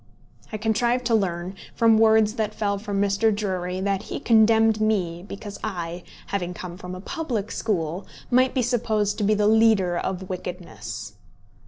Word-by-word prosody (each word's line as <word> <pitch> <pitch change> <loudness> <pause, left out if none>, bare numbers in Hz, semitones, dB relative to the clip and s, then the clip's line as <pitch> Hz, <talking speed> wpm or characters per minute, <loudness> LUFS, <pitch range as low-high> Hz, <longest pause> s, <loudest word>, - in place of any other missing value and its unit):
I 215 - -3
contrived 235 +3 +1
to 235 - +1
learn, 180 -3 0 0.2
from 225 -1 +4
words 220 -1 +5
that 215 -2 -2
fell 200 -2 -1
from 205 -1 -3
Mr. 200 +2 +2
Drury, 185 -3 -2
that 195 0 0
he - - -6
condemned 225 -1 +4
me 185 -6 0
because 200 +1 -8
I, 175 -4 -4 0.2
having 180 -3 -3
come 175 -1 -7
from 180 -1 -8
a - - -7
public 250 - -3
school, 180 -3 -2 0.2
might 255 +2 +3
be 255 - +2
supposed 220 -4 0
to - - 0
be 210 +1 +3
the 210 0 +1
leader 215 -5 +4
of 185 +1 -3
wickedness! 180 -1 -6
205 Hz, 165 wpm, -24 LUFS, 185-220 Hz, 0.2 s, words